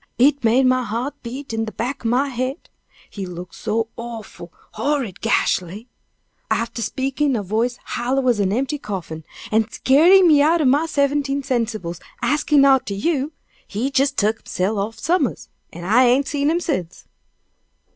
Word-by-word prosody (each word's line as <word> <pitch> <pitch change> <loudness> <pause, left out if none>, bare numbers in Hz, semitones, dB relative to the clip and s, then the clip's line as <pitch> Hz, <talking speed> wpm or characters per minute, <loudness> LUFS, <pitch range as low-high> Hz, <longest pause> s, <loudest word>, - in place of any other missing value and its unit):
It 280 +2 +3
made 240 +4 +4
my 255 0 +3
heart 240 +4 -3
beat 255 +2 -7
in 225 0 -1
de 220 - -6
back 250 +6 -4
o' 225 - 0
my 265 +4 +1
head 255 +4 -4 0.4
he 195 -3 -7
look 175 0 -8
so 225 +1 -2
awful, 225 -7 -8 0.2
horrid 245 -4 -2
gashly! 195 +7 0 0.6
Arter 230 0 -1
speakin' 270 +6 -1
in 265 - +1
a 210 - -2
voice 225 +5 -1
hollow 255 +2 -1
as 240 -4 +3
an 195 -2 +1
empty 275 +7 -1
coffin, 175 - -6 0.3
an' 220 +1 +2
skeerin' 345 +11 +5
me 300 -3 +6
out'n 310 -1 +3
my 300 +4 +2
seventeen 280 -1 0
sensibles 220 - -2 0.2
axin 290 +2 +3
arter 265 -7 +3
you, 290 +6 -1 0.3
he 235 +7 -2
jes 275 +1 +4
tuk 220 -4 0
hisself 200 +3 -2
off 220 +3 -3
summers, 350 +10 -1 0.2
an' 175 - -9
I 225 +8 +4
ain't 255 +3 +3
seen 285 0 0
him 335 +2 +1
sence." 185 - -3
245 Hz, 165 wpm, -21 LUFS, 220-280 Hz, 0.6 s, me